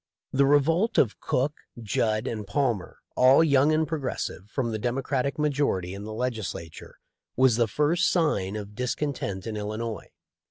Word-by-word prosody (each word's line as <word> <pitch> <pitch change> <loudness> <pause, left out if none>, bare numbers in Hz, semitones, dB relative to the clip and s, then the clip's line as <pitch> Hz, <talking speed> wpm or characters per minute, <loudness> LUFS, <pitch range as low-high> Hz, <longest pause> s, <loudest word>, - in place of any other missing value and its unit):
The 140 +1 +4
revolt 165 - +3
of 110 - +2
Cook, 135 +4 0 0.3
Judd, 110 0 0
and 110 -5 -4
Palmer, 120 -3 -1 0.2
all 130 +5 +6
young 145 -1 +4
and 155 0 +2
progressive, 135 - -4
from 120 -1 -2
the 110 - -3
Democratic 130 +3 -1
majority 140 - 0
in 100 +1 -7
the 110 - -6
Legislature 110 -8 -5 0.4
was 130 -2 +4
the 115 -1 +2
first 150 +9 +2
sign 105 - +1
of 105 -1 -6
discontent 125 -5 -3
in 110 - -4
Illinois. 110 +1 -4
125 Hz, 150 wpm, -26 LUFS, 105-145 Hz, 0.4 s, all